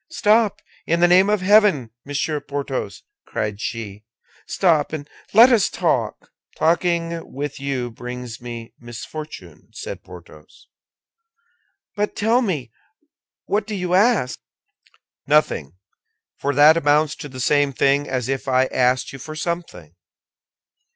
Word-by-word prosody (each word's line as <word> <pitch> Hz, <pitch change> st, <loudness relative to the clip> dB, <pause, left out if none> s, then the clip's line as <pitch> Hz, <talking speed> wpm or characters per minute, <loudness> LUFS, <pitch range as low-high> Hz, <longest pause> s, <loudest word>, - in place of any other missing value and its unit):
"Stop, 215 Hz, -7 st, +2 dB, 0.2 s
in 170 Hz, +1 st, +2 dB
the 175 Hz, -, +5 dB
name 185 Hz, +3 st, +5 dB
of 210 Hz, -2 st, +1 dB
heaven, 190 Hz, -, +4 dB
Monsieur 145 Hz, +2 st, -2 dB
Porthos!" 140 Hz, -9 st, -5 dB, 0.2 s
cried 105 Hz, 0 st, -3 dB
she. 105 Hz, -3 st, -5 dB, 0.4 s
"Stop, 160 Hz, -6 st, +2 dB
and 145 Hz, -2 st, -5 dB, 0.2 s
let 235 Hz, +5 st, +8 dB
us 225 Hz, -5 st, +3 dB
talk." -, -, -1 dB, 0.3 s
"Talking 170 Hz, 0 st, 0 dB
with 145 Hz, +1 st, -5 dB
you 135 Hz, -3 st, -3 dB
brings 125 Hz, 0 st, -8 dB
me 120 Hz, -2 st, -8 dB
misfortune," 120 Hz, -, -9 dB
said -, -, -7 dB
Porthos. 85 Hz, -4 st, -15 dB, 1.3 s
"But, 210 Hz, 0 st, -2 dB
tell 230 Hz, +4 st, +2 dB
me, 150 Hz, -, -2 dB, 0.7 s
what 205 Hz, +1 st, -1 dB
do 215 Hz, -, -4 dB
you 180 Hz, -2 st, -2 dB
ask?" 195 Hz, -, +2 dB, 0.9 s
"Nothing; 135 Hz, -, +1 dB, 0.6 s
for 140 Hz, 0 st, -1 dB
that 150 Hz, +3 st, +7 dB
amounts 150 Hz, 0 st, +2 dB
to 150 Hz, -3 st, -8 dB
the 130 Hz, -1 st, -9 dB
same 145 Hz, +2 st, +2 dB
thing 140 Hz, +2 st, +1 dB
as 130 Hz, -3 st, -2 dB
if 135 Hz, 0 st, -3 dB
I 130 Hz, 0 st, +3 dB
asked 125 Hz, +1 st, +1 dB
you 135 Hz, -, -8 dB
for 155 Hz, +4 st, -8 dB
something." 155 Hz, -, -5 dB
145 Hz, 130 wpm, -21 LUFS, 125-175 Hz, 1.3 s, let